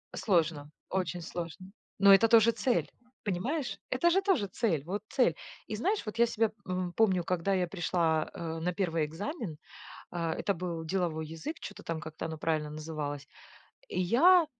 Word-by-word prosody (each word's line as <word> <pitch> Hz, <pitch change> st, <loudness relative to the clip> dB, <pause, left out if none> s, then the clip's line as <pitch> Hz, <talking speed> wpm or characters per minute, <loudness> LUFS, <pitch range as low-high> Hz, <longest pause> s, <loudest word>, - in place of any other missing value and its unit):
Сложно, 160 Hz, -6 st, +1 dB, 0.2 s
очень 185 Hz, -1 st, -1 dB
сложно, 175 Hz, +3 st, -6 dB, 0.3 s
но 200 Hz, 0 st, +8 dB
это 210 Hz, +4 st, +7 dB
тоже 230 Hz, 0 st, +6 dB
цель, 230 Hz, +2 st, 0 dB, 0.3 s
понимаешь? 210 Hz, -, -2 dB
Это 260 Hz, +7 st, +3 dB
же 380 Hz, +3 st, +3 dB
тоже 380 Hz, -, +2 dB
цель. 180 Hz, -, 0 dB
Вот 195 Hz, +4 st, -3 dB
цель. 245 Hz, -, +3 dB, 0.3 s
И 215 Hz, -, -3 dB
знаешь, 390 Hz, -, 0 dB
вот 215 Hz, +1 st, -5 dB
я 235 Hz, -, +6 dB
себя, 225 Hz, -1 st, +1 dB
м, 180 Hz, -1 st, -2 dB
помню, 190 Hz, -5 st, +3 dB
когда 180 Hz, +2 st, 0 dB
я 180 Hz, -2 st, +1 dB
пришла, 170 Hz, -3 st, 0 dB
э, 165 Hz, -1 st, -4 dB
на 180 Hz, +2 st, -1 dB
первый 165 Hz, -4 st, 0 dB
экзамен, 185 Hz, -, -5 dB, 0.5 s
а, 165 Hz, -2 st, -2 dB
это 200 Hz, -, 0 dB
был 170 Hz, -2 st, -4 dB
деловой 160 Hz, -2 st, -1 dB
язык, 165 Hz, -, -6 dB
чё-то -, -, -8 dB
там 165 Hz, -1 st, -3 dB
как-то 155 Hz, +1 st, -7 dB
оно 160 Hz, -1 st, -5 dB
правильно 155 Hz, -1 st, 0 dB
называлось, 150 Hz, -2 st, -5 dB, 0.6 s
и -, -, -3 dB
я 320 Hz, -, +6 dB
180 Hz, 170 wpm, -31 LUFS, 160-220 Hz, 0.6 s, но